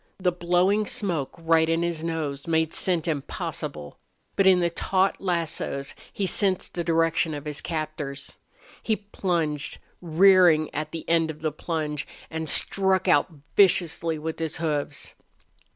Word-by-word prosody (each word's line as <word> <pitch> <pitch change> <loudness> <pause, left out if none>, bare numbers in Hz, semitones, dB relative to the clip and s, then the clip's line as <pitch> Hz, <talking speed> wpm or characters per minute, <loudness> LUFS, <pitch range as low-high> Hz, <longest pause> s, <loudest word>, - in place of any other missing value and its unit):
The 185 -2 +1
blowing 180 +4 +1
smoke, 175 - -2
right 165 -1 +2
in 165 +1 +1
his 170 -2 -2
nose, 155 -4 -3
made 160 -1 +1
scent 175 -4 0
impossible. 135 - -4 0.4
But 195 - +3
in 185 -1 +6
the 170 -1 +1
taut 190 +3 +1
lassos 165 -6 -2 0.2
he 200 - -2
sensed 190 0 0
the 175 - -2
direction 165 -1 +1
of 145 0 -7
his 150 -1 -2
captors. 155 -4 -5 0.4
He 220 - 0
plunged, 170 -8 -2 0.2
rearing 175 -2 +5
at 155 +1 -3
the 165 - -7
end 165 -1 +2
of 155 0 -7
the 155 - 0
plunge, 150 -2 -3 0.2
and 160 -1 -3
struck 190 +2 +3
out 145 - +4 0.3
viciously 170 -4 +3
with 160 +1 -5
his 160 -1 -2
hoofs. 150 -3 -3
165 Hz, 145 wpm, -25 LUFS, 155-180 Hz, 0.4 s, in